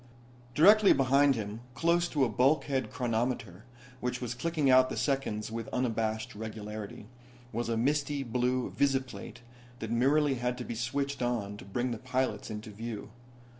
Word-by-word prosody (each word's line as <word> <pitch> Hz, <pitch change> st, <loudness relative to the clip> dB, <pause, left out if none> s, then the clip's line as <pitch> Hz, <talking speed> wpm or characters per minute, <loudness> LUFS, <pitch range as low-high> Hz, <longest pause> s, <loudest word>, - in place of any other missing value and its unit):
Directly 205 Hz, +7 st, +7 dB
behind 135 Hz, +1 st, +4 dB
him, 105 Hz, 0 st, -5 dB
close 170 Hz, +1 st, +2 dB
to 145 Hz, -5 st, +2 dB
a -, -, +1 dB
bulkhead 135 Hz, +3 st, +1 dB
chronometer, 120 Hz, -6 st, -2 dB, 0.3 s
which 125 Hz, 0 st, -2 dB
was 120 Hz, -2 st, -3 dB
clicking 155 Hz, +3 st, -1 dB
out 130 Hz, 0 st, +6 dB
the -, -, -4 dB
seconds 115 Hz, -7 st, -1 dB
with 115 Hz, -1 st, -4 dB
unabashed 110 Hz, -3 st, -1 dB
regularity, 105 Hz, -1 st, -7 dB, 0.5 s
was 115 Hz, +1 st, -2 dB
a 115 Hz, -, 0 dB
misty 140 Hz, +3 st, 0 dB
blue 125 Hz, +1 st, 0 dB
visiplate 130 Hz, -3 st, -1 dB, 0.4 s
that 110 Hz, -2 st, -5 dB
merely 140 Hz, +4 st, +3 dB
had 125 Hz, 0 st, -1 dB
to 125 Hz, -, -5 dB
be -, -, -4 dB
switched 135 Hz, +4 st, -2 dB
on 115 Hz, -5 st, -1 dB
to -, -, -11 dB
bring 120 Hz, +6 st, -2 dB
the 115 Hz, -, -4 dB
pilots 130 Hz, +1 st, -1 dB
into 105 Hz, 0 st, -6 dB
view. 110 Hz, 0 st, -6 dB
125 Hz, 155 wpm, -30 LUFS, 110-135 Hz, 0.5 s, Directly